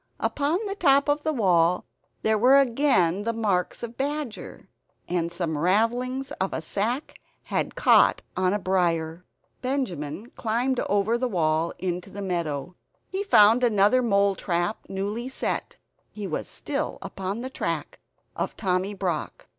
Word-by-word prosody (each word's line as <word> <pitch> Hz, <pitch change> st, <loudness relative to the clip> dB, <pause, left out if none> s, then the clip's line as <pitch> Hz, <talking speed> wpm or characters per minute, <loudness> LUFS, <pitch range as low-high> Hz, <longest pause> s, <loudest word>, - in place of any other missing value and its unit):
Upon 295 Hz, +4 st, 0 dB
the 395 Hz, -, -2 dB
top 280 Hz, -8 st, +3 dB
of 290 Hz, +1 st, +1 dB
the 315 Hz, -, 0 dB
wall 180 Hz, -, +2 dB, 0.4 s
there 220 Hz, 0 st, +3 dB
were 260 Hz, +5 st, +6 dB
again 235 Hz, -, +3 dB
the 230 Hz, +1 st, -1 dB
marks 205 Hz, -5 st, -1 dB
of 235 Hz, 0 st, -6 dB
badger; 285 Hz, -3 st, -4 dB, 0.4 s
and 170 Hz, -1 st, -1 dB
some 170 Hz, -2 st, -2 dB
ravellings 240 Hz, -, +1 dB
of 190 Hz, -, 0 dB
a -, -, -2 dB
sack 230 Hz, -, -2 dB, 0.2 s
had -, -, -2 dB
caught -, -, +4 dB
on 185 Hz, 0 st, +2 dB
a 205 Hz, -, +1 dB
briar. 175 Hz, -3 st, 0 dB, 0.4 s
Benjamin 220 Hz, -, -3 dB
climbed 245 Hz, +3 st, -1 dB
over 205 Hz, +4 st, +2 dB
the 255 Hz, -, 0 dB
wall, 165 Hz, -3 st, +1 dB
into 180 Hz, +2 st, -4 dB
a -, -, -4 dB
meadow. 170 Hz, -3 st, -3 dB, 0.4 s
He 385 Hz, +1 st, -1 dB
found 230 Hz, -, +6 dB
another 220 Hz, +2 st, +4 dB
mole 200 Hz, -4 st, +3 dB
trap 175 Hz, +2 st, -1 dB
newly 205 Hz, +6 st, -3 dB
set; 265 Hz, -, -3 dB, 0.3 s
he 210 Hz, -1 st, -7 dB
was 170 Hz, -, -3 dB
still 295 Hz, +1 st, -3 dB
upon 195 Hz, +4 st, -4 dB
the 260 Hz, +1 st, -5 dB
track -, -, -3 dB, 0.4 s
of -, -, -3 dB
Tommy 190 Hz, +1 st, 0 dB
Brock. 180 Hz, -5 st, -3 dB
205 Hz, 145 wpm, -25 LUFS, 180-255 Hz, 0.4 s, were